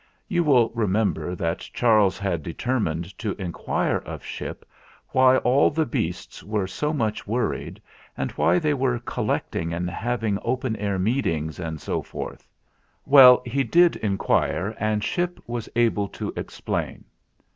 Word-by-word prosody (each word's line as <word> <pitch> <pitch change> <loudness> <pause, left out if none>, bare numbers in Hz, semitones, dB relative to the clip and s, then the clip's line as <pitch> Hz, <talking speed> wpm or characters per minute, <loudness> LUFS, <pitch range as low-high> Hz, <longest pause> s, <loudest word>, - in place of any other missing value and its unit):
You 175 -4 +1
will 125 -7 +4
remember 105 -4 0
that 85 -1 -2
Charles 110 -5 +2
had 95 -5 -2
deter 120 - -2
mined 85 0 -3
to 105 -4 -3
inquire 90 -3 -1
of - - -8
Ship - - -6 0.4
why 130 0 +5
all 130 +3 +4
the 160 +1 0
beasts 90 -6 -4
were 105 -1 -1
so 150 +10 -2
much 110 -10 -2
worried 120 +4 -2 0.4
and - - -2
why - - +2
they 155 -4 +1
were 130 -3 0
col 120 - -4
lecting 85 0 -2
and 90 +1 -2
having 110 -1 -1
open 125 -1 -1
air 100 -1 -1
meetings 90 - -1
and 80 -3 -4
so - - -2
forth. - - -8 0.6
Well, 130 -3 +8
he 135 +3 0
did 170 +8 +4
inquire, 100 -1 0
and 105 0 0
Ship 175 - -1
was 120 -1 -5
able 115 -4 +2
to - - -6
explain. - - -4
110 Hz, 150 wpm, -24 LUFS, 95-130 Hz, 0.6 s, Well